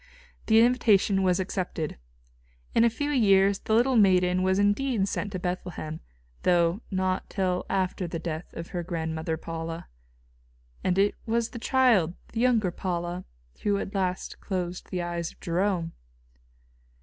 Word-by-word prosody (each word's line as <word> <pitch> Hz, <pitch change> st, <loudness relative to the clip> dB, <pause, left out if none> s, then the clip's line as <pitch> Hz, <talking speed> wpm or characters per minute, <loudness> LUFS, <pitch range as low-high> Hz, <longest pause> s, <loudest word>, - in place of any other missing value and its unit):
] -, -, -30 dB
The 225 Hz, 0 st, +6 dB
invitation 215 Hz, -5 st, +4 dB
was 185 Hz, -1 st, +2 dB
accepted. 180 Hz, -, -3 dB, 0.7 s
In 230 Hz, -, +4 dB
a 235 Hz, -, +5 dB
few 290 Hz, +6 st, -2 dB
years 200 Hz, -6 st, +4 dB
the 220 Hz, -, 0 dB
little 245 Hz, +2 st, +4 dB
maiden 185 Hz, -3 st, +4 dB
was 190 Hz, 0 st, +2 dB
indeed 205 Hz, +1 st, +2 dB
sent 200 Hz, 0 st, -3 dB
to -, -, -1 dB
Bethlehem, 180 Hz, -3 st, -4 dB, 0.4 s
though 175 Hz, +2 st, +2 dB
not 185 Hz, -1 st, -1 dB
till 185 Hz, -2 st, -1 dB
after 185 Hz, -1 st, -1 dB
the 165 Hz, -, -4 dB
death 160 Hz, 0 st, -5 dB
of 165 Hz, 0 st, -6 dB
her 175 Hz, -, -3 dB
grandmother 160 Hz, -1 st, -3 dB
Paula. 165 Hz, 0 st, -6 dB, 1.0 s
And 185 Hz, 0 st, +1 dB
it 200 Hz, +1 st, +3 dB
was 230 Hz, +1 st, +1 dB
the 235 Hz, -, -8 dB
child, 225 Hz, -, +3 dB, 0.2 s
the 225 Hz, -, -2 dB
younger 230 Hz, -6 st, +3 dB
Paula, 175 Hz, 0 st, -3 dB, 0.4 s
who 205 Hz, -1 st, +1 dB
at 200 Hz, -, -4 dB
last 185 Hz, -2 st, -2 dB
closed 180 Hz, -2 st, -4 dB
the 180 Hz, -1 st, -2 dB
eyes 170 Hz, -1 st, -3 dB
of -, -, -30 dB
Jerome. 175 Hz, -1 st, 0 dB
185 Hz, 150 wpm, -27 LUFS, 175-205 Hz, 1.0 s, The